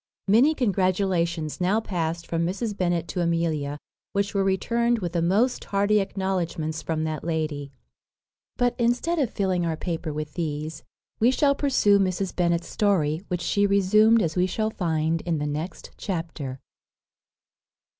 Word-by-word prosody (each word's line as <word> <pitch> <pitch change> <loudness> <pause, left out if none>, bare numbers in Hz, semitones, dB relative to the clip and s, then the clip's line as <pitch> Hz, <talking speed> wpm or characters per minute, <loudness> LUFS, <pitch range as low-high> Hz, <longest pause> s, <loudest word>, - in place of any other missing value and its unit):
Many 250 +10 +5
congratulations 185 - 0
now 190 +5 +3
past 170 -5 -3
from 165 0 -1
Mrs. 205 +5 -2
Bennet 175 -3 0
to 180 - -2
Amelia, 165 -4 0 0.4
which 200 0 0
were 200 -1 +2
returned 235 +5 +1
with 180 -6 -3
the 170 - +1
most 205 +9 +1
hearty 205 +1 +2
acknowledgments 185 -5 -2
from 155 -1 -2
that 155 -2 -3
lady. 155 -4 -2 0.9
But, 245 -1 +2
instead 245 +9 +1
of 265 -6 +1
filling 190 -5 0
our 165 -2 -1
paper 165 -2 -3
with 150 0 -5
these, 155 -2 -4 0.4
we 230 - +5
shall 280 +2 +3
pursue 255 -8 +3
Mrs. 190 0 -1
Bennet's 170 -1 +1
story, 170 -7 +1
which 180 -2 -2
she 200 +4 +2
resumed 215 +3 +4
as 160 -2 -2
we 180 0 +2
shall 215 +3 -1
find 160 -3 0
in 170 -2 -1
the 150 - -2
next 150 +5 -5
chapter. 165 -8 -4
180 Hz, 150 wpm, -25 LUFS, 160-205 Hz, 0.9 s, Many